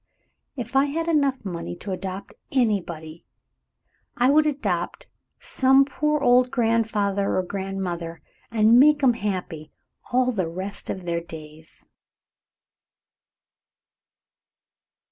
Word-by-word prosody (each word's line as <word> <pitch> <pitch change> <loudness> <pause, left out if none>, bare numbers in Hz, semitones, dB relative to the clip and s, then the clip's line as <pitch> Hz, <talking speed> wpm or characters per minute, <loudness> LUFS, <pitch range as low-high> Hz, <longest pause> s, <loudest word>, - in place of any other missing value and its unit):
If 245 0 -6
I 270 +1 +5
had 325 +4 -3
enough 280 -7 +1
money 170 - -5
to 195 - -7
adopt 190 +1 -6 0.2
anybody, 175 - -1 0.9
I 250 +3 +4
would 305 +1 +4
adopt 225 - -2 0.3
some 270 +1 +4
poor 300 +2 -1
old 250 -1 +4
grandfather 220 -5 0
or 185 - +1
grandmother 180 -3 -4 0.3
and 230 +1 +5
make'm 285 -3 +5
happy 185 -8 -4 0.4
all 255 +1 +2
the 185 -8 -2
rest 190 +4 -5
of 185 -2 -5
their 170 -1 -1
days." 155 -1 -12
210 Hz, 105 wpm, -24 LUFS, 180-265 Hz, 0.9 s, I